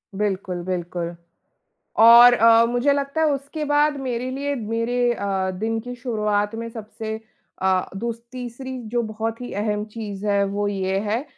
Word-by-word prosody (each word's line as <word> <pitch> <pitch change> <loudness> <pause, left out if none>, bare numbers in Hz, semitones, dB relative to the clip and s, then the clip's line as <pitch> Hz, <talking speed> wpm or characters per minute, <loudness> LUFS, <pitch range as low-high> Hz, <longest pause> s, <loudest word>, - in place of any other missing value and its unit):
बिल्कुल, 190 -3 -2
बिल्कुल। 175 -1 -3 0.8
और 235 +2 +9
अ, 230 0 +6
मुझे 245 +4 +2
लगता 280 +2 -1
है 320 - +4
उसके 280 +3 -4
बाद 295 0 +2
मेरे 255 -1 -3
लिए, 280 +2 -2
मेरे 240 +1 0
अ, 195 -3 -1
दिन 225 +4 -2
की 245 +2 -7
शुरुआत 210 -4 -1
में 230 +1 -4
सबसे 220 0 -6 0.5
अ, 190 -1 +1
दूस 230 +2 -4
तीसरी 255 +1 -6
जो 240 +2 0
बहुत 225 +1 -4
ही 245 - -6
अहम 210 -1 -1
चीज़ 210 -2 -7
है, 200 -1 +2
वो 200 +1 -2
ये 195 -1 -1
है, 235 +7 0
225 Hz, 160 wpm, -23 LUFS, 205-245 Hz, 0.8 s, और